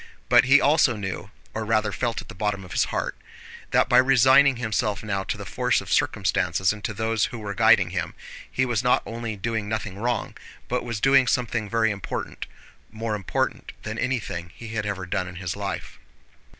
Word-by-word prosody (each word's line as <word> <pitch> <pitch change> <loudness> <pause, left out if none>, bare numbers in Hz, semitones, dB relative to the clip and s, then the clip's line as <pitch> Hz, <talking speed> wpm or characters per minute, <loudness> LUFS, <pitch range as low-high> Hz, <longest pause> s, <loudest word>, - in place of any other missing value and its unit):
But 120 0 +6
he 135 +3 +7
also 145 -5 +4
knew 100 -1 -5 0.2
(or 110 - -3
rather 110 -1 +1
felt 115 +2 -2
at - - -20
the - - -9
bottom 100 0 -2
of 90 - -13
his - - +2
heart) - - -3 0.5
that - - +3
by - - +6
resigning 135 +2 +6
himself 110 -3 -1
now 100 -2 -2
to - - -3
the - - -7
force - - +1
of - - -3
circumstances 95 -2 +1
and 105 -1 -11
to - - -2
those 110 0 +1
who 125 -2 -6
were 105 -2 -5
guiding - - +4
him, - - -3 0.4
he 130 - +1
was 120 -2 0
not 125 - +3
only 115 -1 -5
doing 105 +1 -3
nothing 105 -3 -4
wrong, 120 0 -2 0.3
but 125 - -1
was 115 -3 -4
doing 135 -1 +5
something 115 -4 0
very 115 0 +2
important—more 110 +2 -6
important 100 -3 -2
than 110 +1 -5
anything 105 -10 -3
he 115 - -9
had 110 -2 -3
ever 95 -2 -3
done 90 0 -2
in 90 - -9
his 90 -1 -4
life. 100 -1 -5
110 Hz, 190 wpm, -25 LUFS, 100-120 Hz, 0.5 s, he